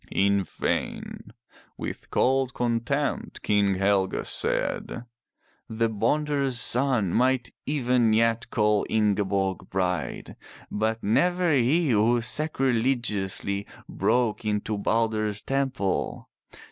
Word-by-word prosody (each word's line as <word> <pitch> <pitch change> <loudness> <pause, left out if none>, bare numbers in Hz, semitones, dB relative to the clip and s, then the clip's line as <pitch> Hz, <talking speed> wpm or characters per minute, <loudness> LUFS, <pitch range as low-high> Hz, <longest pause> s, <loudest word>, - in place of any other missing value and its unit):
In 100 0 +3
vain. - - -4 0.5
With - - -6
cold 130 -1 +1
contempt 120 +4 -2
King 100 -2 +2
Helge 95 0 +1
said: 120 - -2 0.6
"The 115 0 0
bonder's 135 +4 0
son 125 -7 +2
might 130 0 +1 0.2
even 125 -5 +2
yet 115 +1 +1
call 105 -3 +2
Ingeborg 100 -3 0
bride. 90 -1 -2 0.3
But 110 +2 -1
never 175 - +2
he 140 +4 +2
who 115 +2 +3
sacrilegiously 120 -7 0 0.2
broke 110 +3 0
into 105 0 -1
Balder's 110 0 0
temple. 135 -8 -2
115 Hz, 95 wpm, -26 LUFS, 105-130 Hz, 0.6 s, In